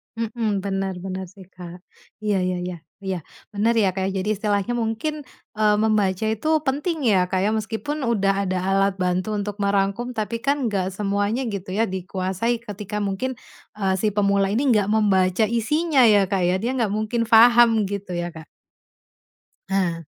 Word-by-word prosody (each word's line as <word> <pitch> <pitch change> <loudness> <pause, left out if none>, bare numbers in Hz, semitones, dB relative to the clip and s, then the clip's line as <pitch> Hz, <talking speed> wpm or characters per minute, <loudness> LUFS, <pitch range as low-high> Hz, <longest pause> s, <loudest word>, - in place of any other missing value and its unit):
Mhm, 220 -3 -2
benar 195 -1 -2
benar 190 0 -4
sih 190 0 -14
Kak. 180 -1 -11 0.5
Iya, 205 -2 +1
ya 180 0 -1
ya 175 - -6 0.2
iya, 190 -2 -3 0.3
bener 220 +3 +2
ya, 195 -4 +3
Kak. 190 0 -1
Jadi, 195 +2 -1
istilahnya 205 +2 -1
mungkin, 240 +7 -2 0.3
eee, 210 -1 +3
membaca 210 -2 +1
itu 220 +8 -1 0.2
penting 295 +5 -1
ya, 185 -4 +3
Kak, 190 - 0
ya, 215 - +1
meskipun 225 +8 -3
udah 205 -5 +1 0.2
ada 185 - 0
alat 195 0 +2
bantu 185 +3 -1
untuk 205 0 -4
merangkum 200 +5 0
tapi 230 +2 -2
kan 280 -1 0
enggak 195 -4 -1
semuanya 205 +5 -1
gitu 200 -4 -5
ya, 225 - +3
dikuasai 190 +4 -2
ketika 210 -2 -7
mungkin, 210 +5 -2 0.4
eee, 190 -2 +1
si 215 - +2
pemula 200 -1 +1
ini 250 +4 +2
enggak 205 -2 +2
membaca 200 -2 +3
isinya 270 +7 +1
ya, 205 -2 +5
Kak, 190 -1 -1
ya, 180 +1 +2
dia 235 +6 -2
enggak 235 -5 0
mungkin 215 +2 -1
paham 230 -1 +6
gitu 195 -2 -4
ya, 175 0 -4
Kak. 160 -1 -11 1.2
Nah. 175 -4 0
205 Hz, 165 wpm, -23 LUFS, 190-225 Hz, 1.2 s, paham